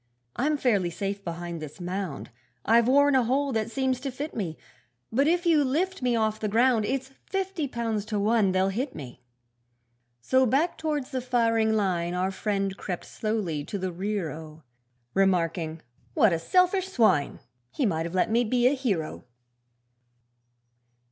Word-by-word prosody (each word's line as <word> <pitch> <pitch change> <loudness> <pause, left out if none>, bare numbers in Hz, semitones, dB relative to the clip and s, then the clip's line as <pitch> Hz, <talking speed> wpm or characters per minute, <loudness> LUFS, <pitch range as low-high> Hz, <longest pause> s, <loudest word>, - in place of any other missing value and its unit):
'I'm 295 +4 +1
fairly 205 -10 +1
safe 195 +4 -4
behind 170 -1 -5
this 155 +3 -9
mound, 180 -6 -4 0.3
I've 230 +1 +4
worn 285 +2 +5
a 260 - +5
hole 270 +4 +1
that 220 -2 -1
seems 260 0 0
to 275 +1 -4
fit 285 +4 -6
me; 175 -8 -3 0.5
But 275 +6 +2
if 350 +2 +2
you 320 -4 +4
lift 345 +8 -1
me 250 -1 +1
off 220 -1 0
the 215 - -1
ground, 230 +1 +3
It's 265 +2 -2 0.2
fifty 385 -5 -2
pounds 230 -4 -2
to 215 -1 -2
one 210 -1 +3
they'll 190 +1 +2
hit 250 +8 -3
me.' 125 -3 -9 1.0
So 260 - +3
back 285 +9 +1
towards 295 -3 -2
the 260 -2 -2
firing 230 -3 +2
line 180 -5 0
Our 185 +1 0
friend 195 -1 -2
crept 180 -3 -5
slowly 205 -9 -2
to 205 - -4
the 185 -1 -3
rear 190 -1 -2
oh! 155 0 -10 0.5
Remarking 165 -4 +1 0.3
'What 210 -5 +5
a 165 - 0
selfish 365 - +2
swine! 220 - +2 0.3
He 275 - -1
might 165 -5 0
have 170 - -7
let 185 - +2
me 235 +2 +3
be 240 +1 +1
a 255 - +5
hero.' 205 - -2
220 Hz, 165 wpm, -27 LUFS, 185-260 Hz, 1.0 s, worn